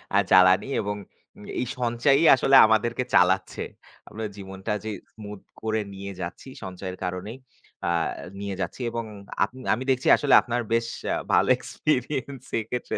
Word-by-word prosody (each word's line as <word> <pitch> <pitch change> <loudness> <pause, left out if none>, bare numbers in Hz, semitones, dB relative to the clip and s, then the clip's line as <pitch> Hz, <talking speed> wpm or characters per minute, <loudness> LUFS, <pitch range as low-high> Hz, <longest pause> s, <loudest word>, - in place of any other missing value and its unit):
আ - - +6
জ্বালানি 95 +4 +6
এবং 105 0 -3 0.4
এ - - -13 0.2
এই - - -1
সঞ্চয়ই 125 +5 +2 0.4
আমাদেরকে 115 +3 +1
চালাচ্ছে। 95 +1 +2 0.5
আমরা 110 +1 -5
জীবনটা 95 0 -6
যে 110 - -4 0.2
smooth 105 -2 -10 0.2
করে 110 0 -1
নিয়ে 100 +1 -7
যাচ্ছি, 85 +9 -7 0.2
সঞ্চয়ের 95 0 -6
কারণেই 90 +6 -4 0.5
আ - - +1 0.5
নিয়ে 100 -1 -4
যাচ্ছি। - - -4
এবং 115 0 -3 0.4
আপনি 125 +6 -4
আমি 125 +4 -3
দেখছি, 130 0 +1
আসলে 145 - +1
আপনার 120 0 -2
বেশ 115 0 +1 0.3
আ - - +1 0.2
ভালো - - +4
এক্সপেরিয়েন্স 135 -1 -2 0.2
এক্ষেত্রে। 120 +3 -4
110 Hz, 145 wpm, -25 LUFS, 95-125 Hz, 0.5 s, আ